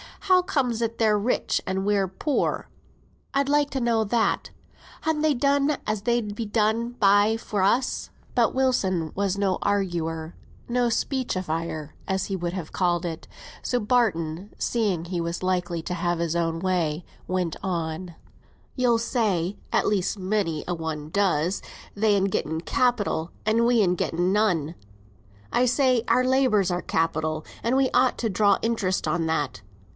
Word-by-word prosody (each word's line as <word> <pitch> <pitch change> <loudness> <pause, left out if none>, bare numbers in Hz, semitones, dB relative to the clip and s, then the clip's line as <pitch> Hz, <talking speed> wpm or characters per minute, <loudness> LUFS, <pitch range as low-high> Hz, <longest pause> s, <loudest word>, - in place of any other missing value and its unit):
How 370 -2 +4
comes 265 -11 -1
it 230 0 -1
they're 215 -2 +3
rich, 230 +5 0
and 190 +1 -1
we're 200 -2 +2
poor? 265 - -1 0.6
I'd 275 0 +1
like 290 0 +3
to 265 - -2
know 230 -2 +2
that. 225 +2 +1 0.5
Han 315 -1 0
they 310 -1 +3
done 280 +2 +2
as 210 -1 -2
they'd 235 -3 0
be 230 - -3
done 220 +2 +1
by 205 -1 +4
for 210 -3 -3
us?" 240 +7 +1 0.2
But 240 -1 +2
Wilson 190 -11 +1
was 200 -1 -1
no 195 -2 +1
arguer; 170 -5 -1 0.4
no 245 0 +2
speechifier 175 - -2 0.2
as 190 -1 -1
he 195 - -2
would 175 -1 -3
have 180 -5 -5
called 175 -1 0
it. 165 -2 -5 0.3
So 245 - 0
Barton, 200 -6 0
seeing 200 -8 0
he 175 0 -3
was 170 +2 -3
likely 180 -2 -1
to 180 - -3
have 175 -1 -1
it - - +1
his 165 0 -1
own 165 -1 0
way, 175 -4 0 0.2
went 180 -3 -1
on. 170 -1 -3 0.6
"You'll 245 -3 +3
say 205 -6 0
(at - - +2
least 205 0 0
many 185 -5 -1
a 175 - -1
one 160 -2 -4
does), 180 -1 +1 0.3
they'n 205 -2 +2
getten 160 -4 -1
capital 205 -7 0
an' 225 +2 +3
we'n 220 -7 +3
getten 175 +1 0
none. 180 -7 +1 0.8
I 250 - +3
say, 255 -1 +3
our 255 - +4
labour's 255 -8 +3
our 175 0 -1
capital 155 -1 -1 0.2
and 235 +3 +1
we 265 -1 +3
ought 255 0 +3
to 230 - 0
draw 200 0 +3
interest 215 -5 0
on 165 -1 0
that. 145 -6 -1
200 Hz, 160 wpm, -25 LUFS, 175-235 Hz, 0.8 s, How